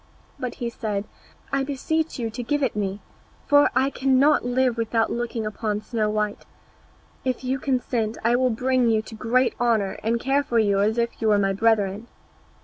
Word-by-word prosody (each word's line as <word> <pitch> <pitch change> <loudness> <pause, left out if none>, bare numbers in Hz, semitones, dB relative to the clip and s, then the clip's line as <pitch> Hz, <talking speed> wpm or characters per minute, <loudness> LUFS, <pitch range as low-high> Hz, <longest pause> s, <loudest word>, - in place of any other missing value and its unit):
But 250 -1 -4
he 235 -1 -4
said, 210 -3 -3 0.5
"I 275 0 +2
beseech 310 +4 -2
you 230 -3 -3
to 245 - -5
give 290 +4 -1
it 250 - 0
me, 200 -1 -2 0.4
for 290 0 +5
I 265 +2 +2
cannot 270 +3 +3
live 245 0 +1
without 225 -1 0
looking 235 -1 -3
upon 215 0 -2
Snow 215 -2 -1
white; 210 -1 -2 0.8
if 255 0 -2
you 260 +1 -1
consent 245 -4 -1
I 235 +2 +3
will 255 +1 +2
bring 250 +1 +1
you 220 -1 +2
to 225 - -11
great 240 +3 +1
honour, 225 -5 +1
and 230 +2 0
care 270 +3 +1
for 255 -5 -2
you 200 -3 +3
as 215 +3 +1
if 235 0 -2
you 225 - +1
were 210 -1 +4
my 195 -1 +1
brethren." 210 0 +1
235 Hz, 185 wpm, -24 LUFS, 215-255 Hz, 0.8 s, for